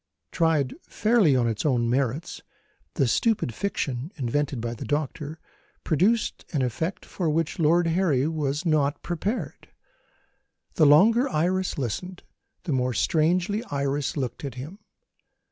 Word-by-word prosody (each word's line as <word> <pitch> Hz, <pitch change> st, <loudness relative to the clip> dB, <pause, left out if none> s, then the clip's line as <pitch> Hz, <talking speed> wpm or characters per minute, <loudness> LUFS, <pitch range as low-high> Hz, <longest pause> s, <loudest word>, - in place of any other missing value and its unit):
Tried 160 Hz, -6 st, +1 dB, 0.2 s
fairly 210 Hz, -, +3 dB
on 120 Hz, -2 st, +2 dB
its 110 Hz, -2 st, -2 dB
own 125 Hz, -5 st, +1 dB
merits, 130 Hz, +4 st, -1 dB, 0.5 s
the 135 Hz, -, +2 dB
stupid 210 Hz, -, +1 dB
fiction 145 Hz, -, -3 dB
invented 140 Hz, 0 st, -1 dB
by 115 Hz, +1 st, -3 dB
the 115 Hz, -, -7 dB
doctor 150 Hz, +1 st, -3 dB, 0.5 s
produced 205 Hz, +9 st, +1 dB
an 140 Hz, -4 st, +1 dB
effect 160 Hz, -, -3 dB
for 175 Hz, -4 st, -2 dB
which 160 Hz, +2 st, -1 dB
Lord 165 Hz, +2 st, +4 dB
Harry 165 Hz, -5 st, +2 dB
was 150 Hz, 0 st, -2 dB
not 150 Hz, -3 st, +1 dB
prepared. 175 Hz, -, -3 dB, 1.1 s
The 155 Hz, -, +4 dB
longer 225 Hz, -, +5 dB
Iris 185 Hz, 0 st, 0 dB
listened, 175 Hz, -, -4 dB, 0.4 s
the 175 Hz, -, -3 dB
more 125 Hz, -2 st, 0 dB
strangely 175 Hz, -, +1 dB
Iris 140 Hz, +1 st, -2 dB
looked 130 Hz, 0 st, -3 dB
at 135 Hz, -4 st, -5 dB
him. 150 Hz, +11 st, -8 dB
150 Hz, 130 wpm, -25 LUFS, 135-180 Hz, 1.1 s, longer